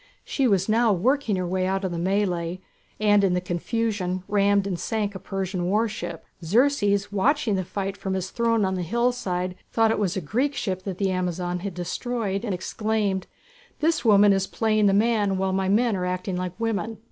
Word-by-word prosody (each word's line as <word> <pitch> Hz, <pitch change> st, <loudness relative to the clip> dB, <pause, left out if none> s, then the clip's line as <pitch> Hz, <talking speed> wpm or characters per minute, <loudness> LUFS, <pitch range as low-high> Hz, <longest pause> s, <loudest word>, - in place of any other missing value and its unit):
She 270 Hz, -3 st, +1 dB
was 195 Hz, -4 st, +2 dB
now 225 Hz, +1 st, +3 dB
working 235 Hz, +4 st, +1 dB
her 185 Hz, -1 st, -1 dB
way 185 Hz, +1 st, 0 dB
out 195 Hz, +1 st, -1 dB
of 185 Hz, -, -2 dB
the 170 Hz, -, -3 dB
mêlée, 180 Hz, -2 st, 0 dB, 0.4 s
and 205 Hz, -1 st, +4 dB
in 185 Hz, -2 st, +3 dB
the -, -, +2 dB
confusion 185 Hz, +1 st, -2 dB
rammed 200 Hz, -1 st, +3 dB
and 185 Hz, -4 st, -3 dB
sank 210 Hz, -2 st, -2 dB
a 190 Hz, -, -7 dB
Persian 185 Hz, -2 st, -3 dB
warship. 205 Hz, -5 st, -2 dB, 0.2 s
Xerxes, 205 Hz, -, +2 dB
watching 245 Hz, +4 st, +1 dB
the 190 Hz, -1 st, 0 dB
fight 195 Hz, +2 st, -4 dB
from 190 Hz, -1 st, -3 dB
his 190 Hz, -1 st, -3 dB
throne 230 Hz, -3 st, +1 dB
on 190 Hz, -, 0 dB
the 185 Hz, -, -2 dB
hillside, 185 Hz, -3 st, -1 dB, 0.2 s
thought 225 Hz, -1 st, +3 dB
it -, -, 0 dB
was 195 Hz, -3 st, 0 dB
a -, -, +1 dB
Greek 255 Hz, -, -1 dB
ship 185 Hz, -2 st, -2 dB
that 190 Hz, -3 st, -4 dB
the 195 Hz, -1 st, 0 dB
Amazon 180 Hz, -1 st, -2 dB
had 190 Hz, -1 st, -5 dB
destroyed 200 Hz, +2 st, -3 dB
and 220 Hz, -, -2 dB
exclaimed: 205 Hz, 0 st, -1 dB, 0.5 s
"This 315 Hz, -4 st, +1 dB
woman 205 Hz, -3 st, +6 dB
is 195 Hz, 0 st, 0 dB
playing 215 Hz, -1 st, +2 dB
the 195 Hz, -, +3 dB
man 210 Hz, -3 st, +2 dB
while 190 Hz, 0 st, 0 dB
my 190 Hz, 0 st, 0 dB
men 225 Hz, +2 st, +3 dB
are 180 Hz, -1 st, -2 dB
acting 185 Hz, +1 st, -2 dB
like 180 Hz, +2 st, -4 dB
women!" 225 Hz, -1 st, -2 dB
195 Hz, 195 wpm, -25 LUFS, 185-220 Hz, 0.5 s, woman